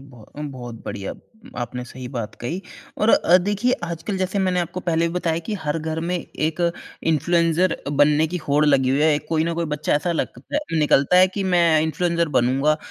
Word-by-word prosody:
बहुतम 140 +2 -10
बहुत 120 -2 -8
बढ़िया। 95 -1 -5 0.5
आपने 125 +1 -4
सही 125 0 -9
बात 120 -5 -5
कही। 160 +10 -3 0.4
और 215 - +2
अ, 180 -4 +5
देखिए 205 +6 +1
आजकल 170 +4 -4
जैसे 185 +1 -1
मैंने 185 -2 +1
आपको 175 +2 -4
पहले 170 -1 +1
भी 170 - -7
बताया 165 -2 0
कि 215 - -2
हर 150 +2 -1
घर 160 0 -3
में 175 +2 -2
एक 160 -1 -3 0.5
इन्फ्लुएंसर 170 +2 +2
बनने 145 +2 +3
की 180 +3 -4
होड़ 145 +2 +3
लगी 135 -3 +3
हुई 140 - +2
है। 150 -1 +4
कोई 160 +1 -1
न 170 0 -1
कोई 170 0 -1
बच्चा 150 0 -1
ऐसा 170 +4 0
लगता 290 - -3 0.2
निकलता 150 +2 +3
है 185 - +7
कि 200 - -2
मैं 170 -4 +4
इन्फ्लुएंसर 170 +1 0
बनूँगा। 135 +5 +2
160 Hz, 190 wpm, -22 LUFS, 145-175 Hz, 0.5 s, है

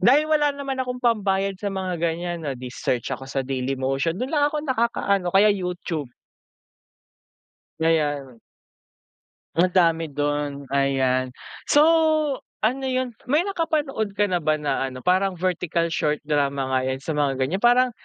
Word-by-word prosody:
dahil 275 +6 +5
wala 305 -1 +2
naman 275 -2 -3
akong 250 -1 -3
pambayad 195 -4 +2
sa 205 - -1
mga 185 -3 -3
ganyan 170 +1 -2
no, 140 -4 -4
di 125 0 -8
search 125 -2 -2
ako 135 - -6
sa 135 -1 -2
Dailymotion 135 +4 -1
dun 255 +8 -4
lang 290 -2 +3
ako 300 0 -4
nakaka-ano 225 - 0
o 175 - -5
kaya 210 +2 +6
YouTube. 180 -6 -4 1.7
Yeah, 160 0 +2
yeah. 145 -5 0 1.2
Ang 170 +3 +4
dami 165 -2 +3
dun 145 0 -2
ayan. 135 -2 +1 0.4
So, 290 - +5 0.8
ano 260 +5 +1
yun, 255 -1 -1 0.2
may 300 +5 +3
nakapanood 310 - -1
ka 205 - +3
na 180 - +2
ba 155 -1 +2
na 145 -3 -1
ano, 130 -1 -10
parang 185 +1 +2
vertical 175 -1 -1
short 150 -1 0
drama 140 -3 0
nga 130 - +3
yan 130 +1 -3
sa - - -3
mga 145 -2 +1
ganyan 135 +8 0
parang 245 +2 +4
175 Hz, 155 wpm, -23 LUFS, 140-235 Hz, 1.7 s, kaya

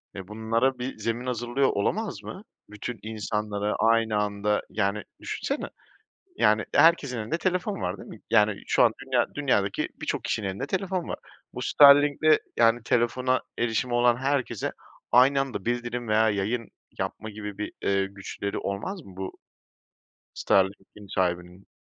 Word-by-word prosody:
eee, 95 -2 -7
bunlara 115 +5 0
bir 125 +2 -4
zemin 115 +2 -3
hazırlıyor 125 +2 0
olamaz 205 - -1
mı? 190 - -8 0.3
Bütün 105 +2 -6
insanlara 105 -1 -2
aynı 115 -1 +3
anda, 105 0 0
yani, 100 +1 -1 0.2
düşünsene, - - -3 0.7
yani, 110 -1 +3
herkesin 150 -6 +4
elinde 110 +10 -2
telefon 185 +2 -1
var 90 +2 -2
değil - - -11
mi? - - -10
Yani, 105 -2 +3
şu - - +4
an 115 - +4
dünya 130 -2 +2
dünyadaki 100 -9 +1
birçok - - -2
kişinin 100 -3 -2
elinde 95 +8 -3
telefon 185 -1 -2
var. - - -4 0.4
Bu - - -6
Starlink'le, 145 +2 +6 0.2
yani, 115 0 +4
telefona 125 +2 +1 0.2
erişimi 120 +1 0
olan 120 0 +4
herkese 135 0 -1 0.4
aynı 130 +3 +6
anda 135 -2 -5
bildirim 120 0 -2
veya 110 +1 +3
yayın 105 +3 -2 0.3
yapma 110 - -4
gibi 105 -1 -7
bir, 105 - -4
eee, 100 0 +1
güçleri 100 +1 -5
olmaz 135 - -4
mı 95 - -13
bu 95 0 -4 1.0
Starlink'in 95 +1 0
sahibinin? 90 +1 -2
115 Hz, 145 wpm, -26 LUFS, 105-130 Hz, 1.0 s, Starlink'le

